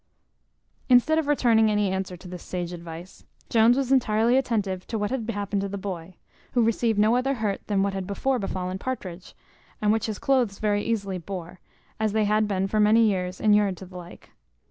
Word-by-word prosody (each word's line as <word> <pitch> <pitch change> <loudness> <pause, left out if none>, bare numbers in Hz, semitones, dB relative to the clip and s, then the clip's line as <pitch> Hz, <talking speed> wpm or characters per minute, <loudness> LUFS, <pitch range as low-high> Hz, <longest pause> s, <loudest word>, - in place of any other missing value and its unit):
Instead 260 +6 +5
of 310 - -2
returning 230 -6 +3
any 210 -2 +1
answer 190 -1 -3
to 180 - -13
this 180 -1 -8
sage 180 -1 -5
advice, 170 +1 -10 0.3
Jones 230 +2 +4
was 270 -1 -1
entirely 235 -2 +3
attentive 205 -8 -1
to 225 - -3
what 210 +1 -2
had 240 -4 -3
happened 205 -2 -2
to 200 - -3
the 200 - -4
boy, 185 -3 -6 0.4
who 245 - +3
received 225 -1 +1
no 215 +3 +4
other 270 +2 +1
hurt 210 -4 -2
than 200 -2 +1
what 200 0 -1
had 190 -1 -4
before 255 +6 0
befallen 185 -2 -3
Partridge, 190 -8 -6 0.4
and 210 -1 +2
which 220 0 0
his 215 -2 -3
cloaths 250 -7 +1
very 205 -1 0
easily 200 -5 -2
bore, 175 0 -7 0.4
as 215 -1 0
they 215 -1 +2
had 215 +1 +2
been 195 -2 0
for 215 +2 0
many 220 +2 +5
years 185 -3 -1
inured 205 -3 +3
to 190 - -9
the 185 0 -15
like. 175 -1 -11
205 Hz, 200 wpm, -25 LUFS, 190-230 Hz, 0.4 s, Instead